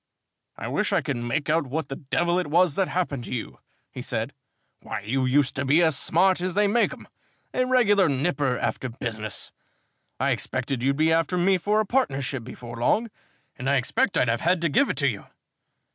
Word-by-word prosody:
"I - - -5
wish - - 0
I - - +2
could - - -3
make 120 +5 -2
out 155 -1 +1
what 140 +2 -3
the 135 - -4
devil 175 +6 0
it 180 - -2
was 170 +1 +3
that 190 +4 +1
happened 150 -8 -2
to - - -9
you," 115 - -6 0.3
he - - -7
said. - - -3 0.5
"Why, 105 - -5
you 130 +6 -1
used 135 +1 +2
to 135 - 0
be 145 +6 +4
as 160 -3 +3
smart 185 +5 +2
as 185 0 -2
they 210 0 +4
make 220 +4 +2
'em, - - -11 0.5
a 255 - +1
regular 205 -8 +4
nipper 140 -2 0
after 130 - -2
business. 110 -3 -5 0.7
I - - +2
expected 135 -4 -2
you'd 140 +2 +1
be 160 +1 +3
after 165 +2 +1
me 185 +1 +3
for 210 +4 +1
a 215 - +1
partnership 140 - -1
before 120 0 -9
long, 215 - +1 0.4
and 130 +2 -3
I 140 - +3
expect 210 - +1
I'd - - +3
have 115 +1 0
had 175 +1 +2
to 170 - +1
give 275 - +3
it 145 - -2
you. 120 -8 0
150 Hz, 205 wpm, -25 LUFS, 130-185 Hz, 0.7 s, be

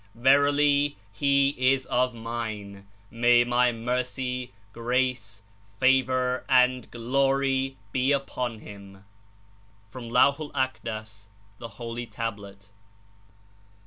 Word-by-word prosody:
Verily, 145 +3 +3 0.2
he 140 +5 +3 0.2
is 135 -1 -3
of 125 0 0
Mine. 110 -4 -6 0.2
May 120 +1 +4
My 120 0 +2
Mercy, 125 +1 -3 0.2
(^race. 120 -3 -2 0.4
Favor 130 -1 +2
and 125 -1 +3
(jlory 135 +2 0 0.2
be 130 +4 +1
unto 125 -4 -2
him 100 -2 -13 0.4
'/' 100 0 -33
(From 120 0 -8
Laivh 135 +4 +4
i'l 155 -2 -6
.ndas—Thc 110 -5 -6
Holy 115 +2 -7
Tablet.) 100 -3 -7
120 Hz, 95 wpm, -26 LUFS, 110-130 Hz, 0.4 s, May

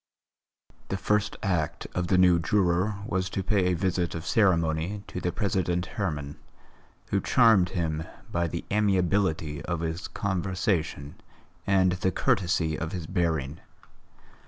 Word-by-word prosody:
The 95 - -2
first 105 +1 0
act 90 -6 -1
of 90 -1 -1
the 90 - +3
new 90 -2 +5
juror 90 +3 +1
was 95 -3 -1
to 95 - -3
pay 95 0 +2
a 90 - +2
visit 90 -1 -1
of 85 0 -5
ceremony 85 0 +1
to 90 - -6
the 90 - -1
President 90 -4 0
Herman, 75 -9 -4 0.7
who - - +2
charmed 110 -7 +4
him 80 -2 -1 0.3
by 85 0 0
the 85 +1 -5
amiability 95 -6 +1
of 85 -2 -2
his 80 +1 -3
conversation 90 -6 -2 0.5
and 95 -2 +4
the 95 +1 0
courtesy 90 - +1
of 85 -1 -4
his 90 -4 -4
bearing. 80 -5 -1
90 Hz, 135 wpm, -27 LUFS, 85-95 Hz, 0.7 s, new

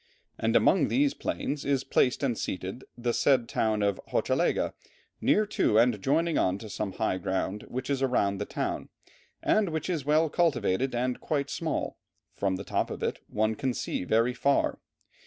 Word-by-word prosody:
And - - +1
among - - +4
these 285 +1 +2
plains 145 0 -3
is 140 -2 +1
placed 130 +1 +2
and 125 -4 +1
seated 95 +4 -4
the 120 0 -1
said 130 -3 +3
town 110 -2 0
of 100 -1 0
Hochelaga - - +1 0.5
near 215 - +3
to 200 - +1
and 115 -3 +3
joining 160 - +2
on 95 +1 +1
to 110 0 -9
some 100 -1 -3
high 95 - -1
ground 95 +3 -2
which 130 +1 -4
is 140 -2 -1
around 100 -7 +1
the 105 - -2
town; - - -3 0.5
and 215 -4 +3
which 160 +2 -2
is 160 -5 -1
well 155 +3 +3
cultivated 135 - +1
and 125 +1 -1
quite 145 -2 -1
small; 160 -3 -2 0.3
from 95 -2 0
the 95 - -5
top - - -1
of - - -6
it - - -1
one 110 +1 0
can 125 +2 -2
see - - -2
very 115 +6 +2
far. 140 +3 +1
125 Hz, 175 wpm, -28 LUFS, 105-145 Hz, 0.5 s, among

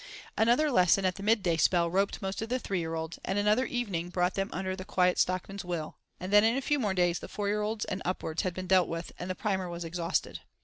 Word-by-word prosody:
Another 245 +7 +3
lesson 185 -2 +4
at 185 - +2
the 195 - -10
midday 200 -5 +2
spell 170 +1 +3
roped 195 +4 0
most 190 +2 -3
of 225 - -4
the 255 - +1
three 195 -7 -2
year 165 -1 -3
olds, 160 0 -5
and 195 - -2
another 210 +5 +2
evening 195 -9 -2
brought 180 0 0
them 195 +1 -2
under 185 +1 -3
the 185 - -7
Quiet 180 -2 +2
Stockman's 185 +2 -1
will, 170 -3 -4 0.2
and 185 +2 -5
then 210 0 +8
in 225 +3 +3
a - - 0
few 295 +2 +1
more 205 -6 0
days 175 -1 +2
the - - -8
four 205 -1 -3
year 210 +1 0
olds 210 +1 -2
and 190 0 -4
upwards 175 -3 -2
had 185 -2 -3
been 185 - -4
dealt 185 0 +4
with, 165 0 -5
and 180 - -5
the 185 - -2
Primer 190 -3 -1
was 170 0 -5
exhausted. 170 +1 -2
185 Hz, 255 wpm, -29 LUFS, 175-210 Hz, 0.2 s, then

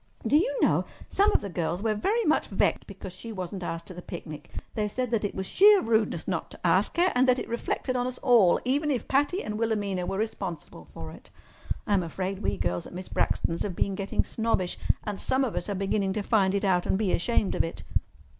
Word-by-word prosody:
Do - - +3
you - - +3
know, - - +3 0.2
some 405 +2 +3
of - - +2
the 200 - -5
girls 175 +2 -2
were 220 -1 +2
very 415 - 0
much 310 - +2
vexed 195 - 0
because 195 -2 -8
she 225 +5 -9
wasn't 185 -1 -5
asked 170 -1 -4
to - - -9
the 180 - -8
picnic. 155 -4 -8 0.2
They 210 -1 0
said 250 +3 -3
that 230 -3 +1
it 205 - -2
was 190 - -3
sheer 405 - +6
rudeness 220 - +1
not 180 -4 -2
to - - -12
ask 185 - +3
her, 360 +2 +4
and 255 +1 +3
that 255 0 +5
it - - -4
reflected 235 +2 -2
on 245 0 0
us 255 0 -5
all, 235 -9 +5
even 285 +4 +1
if 260 -5 -1
Patty 290 +8 +1
and 210 0 -4
Wilhelmina 205 -5 -1
were 195 - -2
responsible 185 - -4
for 80 +3 -9
it. - - -14 0.6
I'm 200 -3 +2
afraid 185 +3 -3
we - - -1
girls 90 0 -2
at - - -11
Miss 185 +1 -7
Braxton's 165 - 0
have 190 -4 -2
been 195 - 0
getting 195 +1 0
snobbish, 220 -6 -1 0.2
and 205 -2 -4
some 265 +1 +1
of 245 - -2
us - - -3
are 200 - -1
beginning 195 0 0
to 210 0 -2
find 200 -3 +3
it 200 - 0
out 180 -2 +2
and - - +2
be 205 -3 +1
ashamed 205 +1 +1
of - - +2
it." 165 - -5
205 Hz, 230 wpm, -27 LUFS, 185-245 Hz, 0.6 s, sheer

